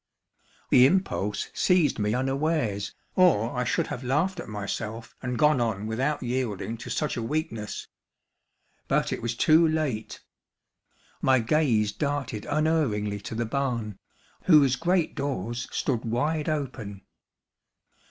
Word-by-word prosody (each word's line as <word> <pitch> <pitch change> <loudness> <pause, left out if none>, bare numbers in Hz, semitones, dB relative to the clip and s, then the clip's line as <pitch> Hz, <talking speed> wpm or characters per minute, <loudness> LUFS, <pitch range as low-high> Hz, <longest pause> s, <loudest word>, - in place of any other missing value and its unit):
The 125 +1 +8
impulse 135 - -1
seized 175 -9 +2
me 105 +1 +1
unawares, 135 -6 -1 0.2
or 130 - +3
I 125 - 0
should 125 - 0
have 125 - -6
laughed 160 +9 0
at - - -7
myself 105 +2 -5
and 125 -1 -3
gone 150 -2 +4
on 110 -3 -1
without 130 +7 -1
yielding 120 -3 -2
to - - -9
such 150 -5 -1
a - - -2
weakness. 115 -4 -3 1.0
But - - +1
it - - -4
was 120 0 -2
too 160 +6 +5
late. 150 -9 -2 1.0
My 130 0 +4
gaze 115 -4 +2
darted 135 -2 -3
unerringly 145 -10 +1
to 105 +2 -7
the 115 +1 -1
barn, 115 -4 -2 0.5
whose 145 -7 +6
great 170 +3 +1
doors 125 -4 -3
stood 125 -5 -1
wide 150 +7 -1
open. 125 -10 -4
125 Hz, 130 wpm, -26 LUFS, 110-150 Hz, 1.0 s, The